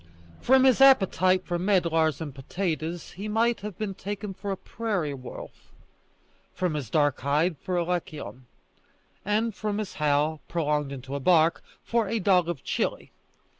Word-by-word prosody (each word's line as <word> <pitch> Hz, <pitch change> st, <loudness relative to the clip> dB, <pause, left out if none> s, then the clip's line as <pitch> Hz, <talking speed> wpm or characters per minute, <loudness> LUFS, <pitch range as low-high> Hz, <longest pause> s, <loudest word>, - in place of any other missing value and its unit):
From 260 Hz, +1 st, +5 dB
his 265 Hz, 0 st, +4 dB
appetite 190 Hz, -8 st, +5 dB
for 175 Hz, -1 st, -2 dB
medlars 170 Hz, -6 st, +2 dB
and 150 Hz, -4 st, -5 dB
potatoes 165 Hz, +3 st, -4 dB
he 200 Hz, +3 st, -7 dB
might 230 Hz, +2 st, +1 dB
have 205 Hz, -2 st, -7 dB
been 210 Hz, -3 st, -3 dB
taken 200 Hz, +1 st, -5 dB
for 200 Hz, +2 st, -7 dB
a 195 Hz, -, -2 dB
prairie 200 Hz, -12 st, -3 dB
wolf; 130 Hz, -2 st, -10 dB, 0.8 s
from 180 Hz, -3 st, -1 dB
his 145 Hz, -7 st, -4 dB
dark 145 Hz, -1 st, +2 dB
hide, 150 Hz, +5 st, +1 dB
for 185 Hz, -, -3 dB
a 175 Hz, -, +2 dB
lycaon; 155 Hz, -7 st, -5 dB, 0.8 s
and 215 Hz, +3 st, 0 dB
from 210 Hz, +1 st, -3 dB
his 215 Hz, -3 st, -4 dB
howl 150 Hz, +1 st, +1 dB
prolonged 150 Hz, -4 st, -1 dB
into 135 Hz, 0 st, -7 dB
a 140 Hz, -, -2 dB
bark, 165 Hz, +2 st, +3 dB, 0.2 s
for 230 Hz, -2 st, 0 dB
a 230 Hz, -, 0 dB
dog 180 Hz, -4 st, +3 dB
of 170 Hz, -6 st, -4 dB
Chili. -, -, -2 dB
180 Hz, 160 wpm, -26 LUFS, 150-205 Hz, 0.8 s, From